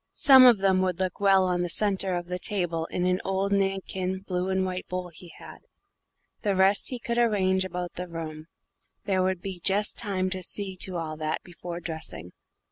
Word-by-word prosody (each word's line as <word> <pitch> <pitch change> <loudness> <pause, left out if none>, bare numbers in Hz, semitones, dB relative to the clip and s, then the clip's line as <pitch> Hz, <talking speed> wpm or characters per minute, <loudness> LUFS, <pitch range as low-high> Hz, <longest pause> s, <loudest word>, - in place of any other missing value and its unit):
Some 265 -3 +8
of 240 -3 +7
them 190 -1 +2
would 185 -2 -1
look 185 -1 -2
well 195 -2 +4
on 180 -1 0
the 175 - -2
centre 195 -1 0
of 175 0 -3
the 180 +1 -4
table 175 -5 -1
in 180 - -2
an 180 +1 +1
old 195 +1 -1
Nankin 190 -1 -1
blue 180 -1 -2
and 190 0 +1
white 185 0 -4
bowl 180 -1 -4
he 170 +1 -11
had; - - -12 0.8
the 200 -3 0
rest 190 +2 +3
he 255 - -3
could 235 0 -2
arrange 190 -5 +2
about 180 -1 -5
the 180 +1 -5
room: 160 -2 -7 0.6
there 190 -2 +1
would 185 -1 -1 0.2
just 205 +2 +2
be - - -1
time 190 -4 -1
to 185 -1 -2
see 190 +1 -3
to 185 0 -2
all 155 -2 -4
that 155 0 -3
before 175 -1 -8
dressing. 160 - -5
185 Hz, 200 wpm, -26 LUFS, 175-195 Hz, 0.8 s, Some